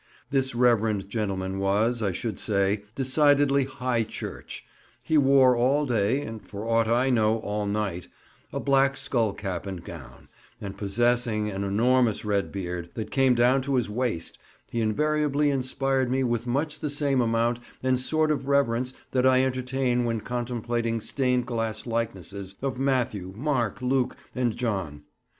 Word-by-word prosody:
This 135 -2 0
reverend 110 -5 +2
gentleman 95 -3 -2
was, 105 +5 +1
I 100 -3 +1
should 110 +4 -4
say, 100 0 0
decidedly 140 0 +3
High 125 -2 -1
Church; - - -8 0.4
he 160 - 0
wore 135 -3 +5
all 135 +5 +2
day 120 +1 +1
(and 110 -5 -7
for 105 +2 -7
aught 115 -1 +2
I 125 +3 +2
know 110 -2 +3
all 105 0 -2
night) 100 -4 -2 0.4
a - - -3
black 135 -1 +2
skull 115 -6 0
cap 95 -2 -5
and 95 -3 -6
gown, 80 -7 -11 0.3
and 100 -1 -6
possessing 110 +1 0
an 95 0 -3
enormous 115 +2 +2
red 100 -2 0
beard, 90 -3 -4
that 110 - -5
came 135 -2 +3
down 125 +3 +4
to 135 +1 -1
his 120 -4 0
waist, 115 -7 -2 0.3
he 115 - -1
invariably 150 +5 +1
inspired 135 -1 0
me 130 +1 +1
with 120 -1 -1
much 150 +5 -1
the 150 - -2
same 140 -2 +1
amount 115 +1 +1 0.2
and 130 -1 +2
sort 155 +4 +1
of 140 -2 -2
reverence 130 -3 +1 0.2
that 130 0 +3
I 130 0 +5
entertain 130 -1 0
when 115 -2 -1
contemplating 120 -1 -2
stained 125 +1 0
glass 115 -3 -3
likenesses 100 -4 -4
of 130 -2 -2
Matthew, 120 -9 0
Mark, 130 -3 -1
Luke, 130 0 +1 0.2
and 120 -3 -1
John. 95 -12 -3
120 Hz, 155 wpm, -26 LUFS, 105-130 Hz, 0.4 s, wore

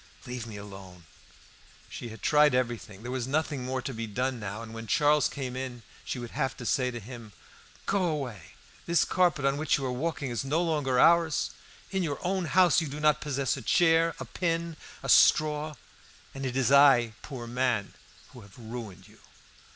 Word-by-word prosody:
Leave 125 -2 -6
me 110 -2 -8
alone." 95 -3 -11 0.8
She 120 - -7
had 115 - -12
tried 150 -3 +5
everything; 120 -5 -3
there 125 - -5
was 130 -1 -2
nothing 145 -1 -1
more 130 0 -3
to 135 - -4
be 115 0 -4
done 125 +4 -2
now; 105 +1 -5
and 115 -1 -10
when 115 0 -7
Charles 150 +5 +3
came 130 -3 -5
in 130 -2 -6 0.2
she - - -4
would 120 -1 -7
have 135 - -2
to 125 - -8
say 125 +1 +1
to 120 -1 -6
him 115 -1 -10 0.5
"Go 195 -2 +1
away! 120 - -4 0.3
This 170 -5 +3
carpet 175 -6 +1
on 140 0 +2
which 155 +1 +1
you 135 - -4
are 130 - -1
walking 140 0 -3
is 120 - -2
no 145 +4 0
longer 145 -6 0
ours. 165 -1 +4 0.4
In 190 -1 0
your 150 -5 -2
own 185 0 0
house 175 +1 +4
you 160 - -3
do 145 +2 -6
not 150 -1 +3
possess 140 -3 -1
a - - -6
chair, 165 -1 +3
a - - -5
pin, 165 -1 -2 0.3
a - - -5
straw, 155 0 +4 0.6
and 135 0 -4
it 130 +1 -3
is 135 0 +2
I, 135 -5 +6
poor 130 -5 -7
man, 120 -3 -1 0.4
who 125 - -13
have 100 +2 -16
ruined 110 -5 -8
you." - - -20
130 Hz, 195 wpm, -28 LUFS, 120-150 Hz, 0.8 s, I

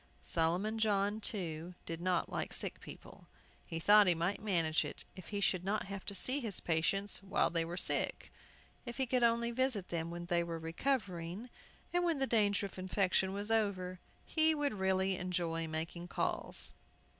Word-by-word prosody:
Solomon 175 - +1
John, 205 -1 +2
too, 175 -4 -3
did 165 0 -5
not 180 -1 +1
like - - -3
sick - - -1
people. - - -12 0.4
He 165 - -4
thought 205 +4 +6
he 175 - +6
might 175 +6 -1
manage 165 -7 +2
it 145 - -6
if 185 -3 -10
he 205 - -3
should 185 -3 +1
not 200 +3 0
have 195 -1 -6
to 200 - -2
see 255 +8 +3
his 225 -7 -3
patients 175 +5 +1
while 195 0 +1
they 165 -1 +3
were 170 +2 -5
sick. - - 0 0.5
If 240 -2 -7
he 265 - +1
could 250 0 +1
only 235 0 +3
visit 240 -6 0
them 165 -1 -2
when 175 0 -6
they 175 -1 +1
were 170 -1 -4
recovering, 180 +2 -2 0.4
and 355 0 +2
when 335 -3 +2
the 270 - +1
danger 205 -4 +2
of 195 - -8
infection 190 0 +1
was 205 +3 0
over, 185 -5 0 0.3
he 315 -1 +3
would 290 -3 0
really 190 -1 +1
enjoy 170 -2 -1
making 165 +2 -4
calls. - - -2
190 Hz, 180 wpm, -34 LUFS, 170-215 Hz, 0.5 s, thought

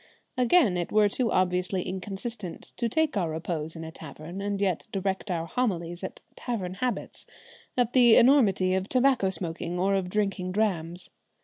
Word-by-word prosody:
Again, 250 - +4
it 175 - -3
were 210 -1 +5
too 235 +3 0
obviously 180 0 +1
inconsistent 195 +1 -6
to 235 -1 0
take 315 +3 +1
our 180 -5 0
repose 160 0 -4
in 165 - -7
a 160 - -7
tavern 160 +4 -8
and 200 0 -2
yet 190 -2 0
direct 195 +1 -2
our 165 -2 -1
homilies 175 -5 -2
at 190 - -6
tavern 195 -7 -4
habits, 245 +6 -4 0.5
at 245 -1 +1
the 240 -3 +7
enormity 205 -8 +5
of 190 +1 -1
tobacco 255 -6 +3
smoking 175 -1 -1
or 190 +2 +1
of 190 -2 0
drinking 195 -2 -1
drams. 180 -5 -1
190 Hz, 165 wpm, -27 LUFS, 175-225 Hz, 0.5 s, the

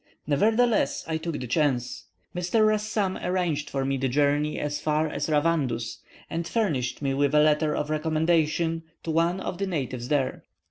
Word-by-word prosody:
Nevertheless 220 - +2
I 160 -1 -1
took 160 -1 -4
the 125 - -4
chance. 125 -1 0 0.3
Mr. 180 +5 +2
Rassam 215 -2 0
arranged 175 -5 -1
for 135 -1 -2
me 135 0 0
the 135 0 0
journey 145 +3 +1
as 145 0 -2
far 155 +1 +1
as 155 - -3
Ravandus, 145 -7 0 0.3
and 165 0 -3
furnished 145 - -1
me 135 -1 +1
with 140 +1 +1
a - - +7
letter 150 0 +3
of 150 - -2
recommendation 160 +1 +1 0.2
to 165 - -2
one 170 +3 +1
of 185 -1 -5
the 195 - -1
natives 130 -8 -3
there. 140 -2 0
155 Hz, 170 wpm, -26 LUFS, 140-170 Hz, 0.3 s, a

